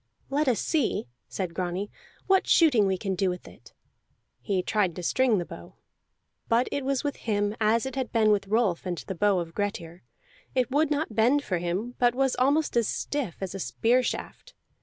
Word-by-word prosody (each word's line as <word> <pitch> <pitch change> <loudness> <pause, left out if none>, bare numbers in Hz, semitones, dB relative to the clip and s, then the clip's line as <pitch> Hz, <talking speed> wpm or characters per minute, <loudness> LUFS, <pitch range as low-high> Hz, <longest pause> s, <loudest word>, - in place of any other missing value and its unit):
"Let 295 +2 +1
us 240 -5 +2
see," 315 -4 0 0.2
said 185 -3 -4
Grani, 185 +3 -3 0.3
"what 385 -1 +3
shooting 250 - +5
we 190 -1 0
can 195 +1 -2
do 185 +1 +1
with 180 0 -6
it." - - -16 0.7
He 190 -3 -1
tried 195 -5 0
to 180 - -6
string 250 +3 +2
the 175 - -2
bow. 85 - -11 0.7
But 235 +2 +3
it 285 - -2
was 270 -1 0
with 290 -1 -2
him 205 -1 -1
as 220 +3 +3
it 265 -1 -5
had 260 -2 -3
been 220 -2 +3
with 200 -1 +1
Rolf 200 -5 +1
and 175 -1 -2
the 190 - -5
bow 200 +2 +2
of 170 -2 -4
Grettir: 180 -4 -4 0.5
it 255 -1 +1
would 295 +2 +2
not 295 -5 -1
bend 245 +7 +3
for 180 -8 -1
him, 185 +8 -3
but 245 -1 +3
was 270 0 +1
almost 285 +4 +2
as 235 -2 +3
stiff 275 - -3
as 190 -2 -4
a 195 - -5
spear 240 +6 +2
shaft. - - -5
215 Hz, 200 wpm, -27 LUFS, 190-260 Hz, 0.7 s, shooting